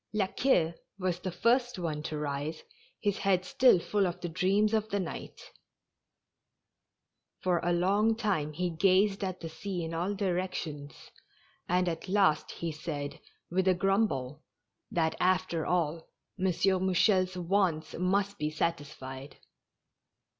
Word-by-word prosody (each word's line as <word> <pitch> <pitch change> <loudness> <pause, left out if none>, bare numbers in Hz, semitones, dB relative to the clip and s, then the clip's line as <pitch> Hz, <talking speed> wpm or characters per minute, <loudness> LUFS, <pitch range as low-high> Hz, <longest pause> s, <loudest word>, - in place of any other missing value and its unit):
La 210 -2 +2
Queue 180 -6 +2 0.2
was 185 -2 -1
the 185 0 -4
first 245 +5 +2
one 160 -4 -3
to 155 0 -4
rise, 150 +1 -3 0.4
his 205 -1 0
head 185 -2 +2
still 250 +2 +5
full 200 +2 +1
of 175 0 -4
the 175 - -4
dreams 195 +5 +2
of 220 0 +1
the 200 - 0
night. 180 -4 -7 1.9
For 180 -2 +2
a 175 - 0
long 200 +6 +3
time 195 -10 -1
he 180 +3 -1
gazed 195 +4 +3
at 185 -1 -3
the 165 - -4
sea 175 +2 -4
in 165 0 -4
all 180 +5 -1
directions, 175 -6 -3 0.6
and 180 +1 +2
at 170 +2 -3
last 190 -6 +3
he 170 -1 -4
said, 150 -2 -5 0.3
with 190 +1 +1
a 185 - +5
grumble, 175 - 0 0.5
that 160 -2 +1
after 185 -3 +1
all 165 -2 -1 0.3
M. 185 - 0
Mouchel's 185 +1 +2
wants 175 -3 0
must 195 +3 0
be 150 0 0
sat 165 +2 0
isfied. 135 -1 -9
180 Hz, 140 wpm, -30 LUFS, 160-195 Hz, 1.9 s, still